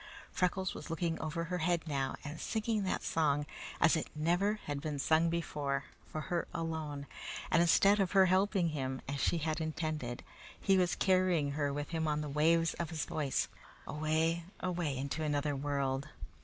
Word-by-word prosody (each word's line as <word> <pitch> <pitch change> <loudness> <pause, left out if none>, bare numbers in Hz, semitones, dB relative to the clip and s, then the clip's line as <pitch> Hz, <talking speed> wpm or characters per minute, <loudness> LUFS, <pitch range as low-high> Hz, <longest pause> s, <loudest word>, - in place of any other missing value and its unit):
Freckles 185 0 0
was - - -8
looking 165 0 -1
over 160 +2 -2
her 180 +2 -2
head 170 0 +1
now 135 -3 -1
and 150 +2 -6
singing 220 -1 0
that 185 - -1
song, 145 -2 +1 0.3
as 165 - +5
it 160 - -2
never 175 +7 +2
had 145 -1 -3
been 150 -1 -3
sung 160 +4 +3
before, 145 -4 -1 0.3
for 155 - -3
her 175 0 -2
alone; 160 -4 -3 0.5
and 170 - +5
instead 200 +4 +5
of 195 -1 +1
her 190 -1 +7
helping 185 -1 +3
him, 130 -3 -3
as 140 +1 -3
she 175 - +2
had 160 0 -1
intended, 155 -6 -3 0.4
he 195 - +3
was 180 -2 +3
carrying 185 -6 +3
her 145 0 0
with 145 +1 -3
him 160 -2 -1
on 150 0 +1
the 150 - -4
waves 165 +3 +3
of 170 -2 -2
his 160 -3 -2
voice, 145 -4 0 0.4
away, 160 +2 0 0.2
away 175 -7 -1
into 140 +4 -3
another 145 -1 0
world. 140 0 -1
160 Hz, 175 wpm, -33 LUFS, 145-175 Hz, 0.5 s, her